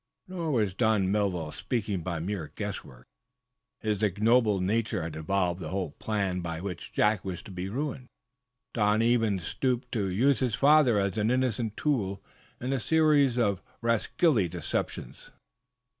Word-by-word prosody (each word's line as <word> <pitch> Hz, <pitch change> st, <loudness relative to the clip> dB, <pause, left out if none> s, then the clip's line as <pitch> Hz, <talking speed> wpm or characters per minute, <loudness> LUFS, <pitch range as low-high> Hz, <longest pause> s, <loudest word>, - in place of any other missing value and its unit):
Nor 175 Hz, -4 st, -3 dB
was 105 Hz, -8 st, +1 dB
Don 105 Hz, -3 st, +2 dB
Melville 95 Hz, -7 st, 0 dB
speaking 100 Hz, +2 st, -2 dB
by 85 Hz, 0 st, -3 dB
mere 90 Hz, -2 st, -4 dB
guesswork. -, -, -6 dB, 0.8 s
His 105 Hz, -2 st, -1 dB
ignoble 105 Hz, +1 st, +3 dB
nature 110 Hz, 0 st, 0 dB
had 80 Hz, -1 st, -5 dB
evolved 90 Hz, +2 st, 0 dB
the 80 Hz, -4 st, -5 dB
whole 95 Hz, -3 st, -2 dB
plan 95 Hz, +1 st, -2 dB
by 85 Hz, -1 st, -4 dB
which 90 Hz, -2 st, -6 dB
Jack 105 Hz, -2 st, +2 dB
was 95 Hz, -3 st, -5 dB
to 110 Hz, -, -11 dB
be 90 Hz, +1 st, -4 dB
ruined. 130 Hz, +2 st, -4 dB, 0.7 s
Don 105 Hz, 0 st, +2 dB
even 115 Hz, -4 st, +2 dB
stooped 125 Hz, +8 st, -2 dB
to 105 Hz, -5 st, 0 dB
use 120 Hz, +8 st, +2 dB
his 125 Hz, -5 st, 0 dB
father 140 Hz, -5 st, +5 dB
as 100 Hz, +2 st, -1 dB
an 105 Hz, +2 st, +2 dB
innocent 120 Hz, -4 st, 0 dB
tool 105 Hz, -10 st, 0 dB, 0.4 s
in 130 Hz, +2 st, -2 dB
a 135 Hz, -, 0 dB
series 150 Hz, -3 st, +3 dB
of 100 Hz, -6 st, +1 dB, 0.2 s
rascally 115 Hz, -, +2 dB
deceptions. 80 Hz, -7 st, -4 dB
105 Hz, 150 wpm, -28 LUFS, 95-120 Hz, 0.8 s, father